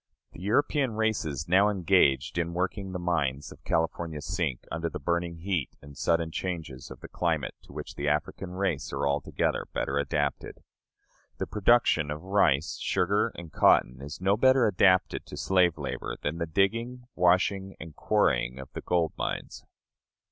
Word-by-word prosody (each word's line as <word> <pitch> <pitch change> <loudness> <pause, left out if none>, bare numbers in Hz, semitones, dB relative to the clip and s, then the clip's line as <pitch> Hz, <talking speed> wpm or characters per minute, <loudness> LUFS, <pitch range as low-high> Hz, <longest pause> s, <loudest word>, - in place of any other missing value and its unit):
The - - -12
European 130 - +1
races 105 - -1
now 95 +4 +5
engaged 85 -6 +2
in 85 0 -2
working 95 +2 -2
the 90 - -3
mines 75 -6 -1
of - - -15
California 80 -1 -1
sink 80 -5 -3
under 80 0 -2
the - - -5
burning 85 0 -1
heat 85 -3 -2
and 70 0 -13
sudden 85 +2 0
changes 80 -8 -5
of - - -11
the - - -8
climate 80 -7 -1
to - - -17
which - - -7
the 70 - -4
African 75 +5 -1
race 95 -6 -2
are 70 - -1
altogether 70 0 -1
better 70 +1 0
adapted. 70 -1 -2 0.7
The - - -2
production 105 -7 +3
of 75 +2 -5
rice, 85 -7 +2
sugar, 100 +4 +1
and 85 -2 -9
cotton, 65 -2 +3
is 70 +1 -7
no 95 +2 +2
better 130 +2 +4
adapted 95 -2 +3
to - - -8
slave 90 -3 +2
labor - - -4
than 75 +3 -2
the 85 - -2
digging, 115 +8 0
washing, 95 +2 +2
and 80 -1 -9
quarrying 60 +2 +1
of 65 0 -10
the - - -5
gold 85 -3 0
mines. - - -4
85 Hz, 160 wpm, -28 LUFS, 75-95 Hz, 0.7 s, now